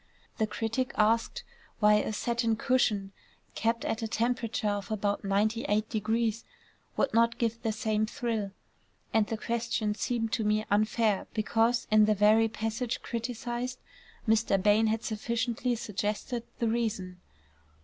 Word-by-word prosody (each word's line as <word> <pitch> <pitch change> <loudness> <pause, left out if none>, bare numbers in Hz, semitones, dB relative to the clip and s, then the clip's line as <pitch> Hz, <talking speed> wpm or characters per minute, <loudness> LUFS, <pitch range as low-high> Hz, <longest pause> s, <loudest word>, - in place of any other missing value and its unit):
The 220 - +2
critic 225 +4 -2
asked 225 +2 +2 0.4
why 210 -1 +6
a 210 - -1
satin 230 +1 0
cushion 220 -6 +1 0.4
kept 230 +1 0
at 225 - -1
a 225 - -1
temperature 230 -1 -1
of 205 0 -2
about 205 -1 -1
98° 215 +2 0 0.5
would 275 - +1
not 230 +1 +3
give 230 -1 -1
the 225 - 0
same 215 0 0
thrill; 225 -3 -2 0.6
and 220 -2 +3
the 225 - -3
question 230 -2 -1
seemed 225 0 -2
to 225 - +1
me 215 +1 +1
unfair 215 0 +2
because, 225 +2 +2
in 215 0 +6
the 215 0 +3
very 215 +2 +5
passage 225 +2 -3
criticised, 240 +1 -3 0.5
Mr. 220 -3 +3
Bain 210 +3 +4
had 220 +1 0
sufficiently 235 +2 -1
suggested 215 +3 -3
the 235 - 0
reason. 215 -6 -2
225 Hz, 135 wpm, -29 LUFS, 210-235 Hz, 0.6 s, why